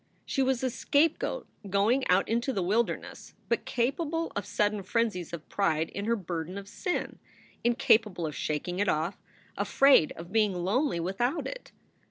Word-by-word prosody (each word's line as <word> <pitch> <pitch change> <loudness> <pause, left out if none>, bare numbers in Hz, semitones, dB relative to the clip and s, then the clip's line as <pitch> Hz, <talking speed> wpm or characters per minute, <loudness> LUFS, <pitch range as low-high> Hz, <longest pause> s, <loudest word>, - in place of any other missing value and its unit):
She 270 - -1
was 260 -1 +1
a 255 - +1
scapegoat 320 - +1 0.2
going 215 +7 +2
out 180 +2 +3
into 235 +4 0
the 195 -7 -1
wilderness, 220 +6 -2
but - - 0
capable 315 +7 -1
of 205 -1 -3
sudden 205 0 0
frenzies 195 -3 -1
of 170 -2 -7
pride 165 -5 0
in 200 - -5
her 230 +1 +2
burden 180 -2 -5
of 200 0 -7
sin, 360 - -3 0.4
incapable 220 -6 +3
of 150 - -4
shaking 175 +4 -2
it 205 - +2
off, 160 +5 -1 0.3
afraid 275 - +5
of 170 +2 -10
being 210 -3 +2
lonely 195 - 0
without 215 - -1
it. - - -7
205 Hz, 160 wpm, -29 LUFS, 180-250 Hz, 0.4 s, afraid